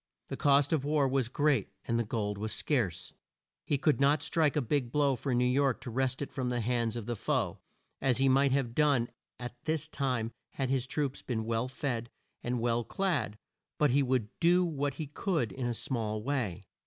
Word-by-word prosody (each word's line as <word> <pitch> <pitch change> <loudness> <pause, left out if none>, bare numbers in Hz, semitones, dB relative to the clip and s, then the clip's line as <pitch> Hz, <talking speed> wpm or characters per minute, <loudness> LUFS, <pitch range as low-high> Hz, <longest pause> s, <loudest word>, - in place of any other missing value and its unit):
The - - -3
cost 140 +1 +3
of 150 -4 +1
war 145 -1 +2
was 130 -3 0
great, 145 -5 +2 0.2
and 115 -2 0
gold 105 -3 -1
was 110 +1 -2
scarce. 95 - -1 0.5
He 145 - +2
could 150 -1 +2
not 145 +2 +4
strike 155 -5 +2
a - - +3
big 125 -1 0
blow 140 -1 +3
for 125 +1 -1
New 125 +1 +3
York 130 0 +2
to 125 - -6
wrest 130 +3 0
it - - -7
from 130 -2 -2
the 120 -1 0
hands 115 0 0
of 115 -3 -4
the 120 - -2
foe, - - -1 0.4
as 130 -3 +2
he 135 +1 +3
might 135 +1 +4
have 130 -4 0
done 140 -4 +3 0.3
at 120 0 -8
this 155 -1 0
time 125 -7 -1 0.2
had 135 -1 -1
his 135 -1 +1
troops 140 -1 -2
been 110 -3 -2
well 115 +2 0
fed 120 -3 -3 0.3
and 120 0 -1
well 120 0 +1
clad 140 - -1 0.4
but 150 -3 +3
he 140 +3 +4
would 130 -5 +1
do 180 +1 +4
what 145 -4 -1
he 155 - -4
could 150 - -1
in 130 -2 -3
a 120 - 0
small 110 -2 -2
way. 110 -9 -2
130 Hz, 205 wpm, -31 LUFS, 115-145 Hz, 0.5 s, not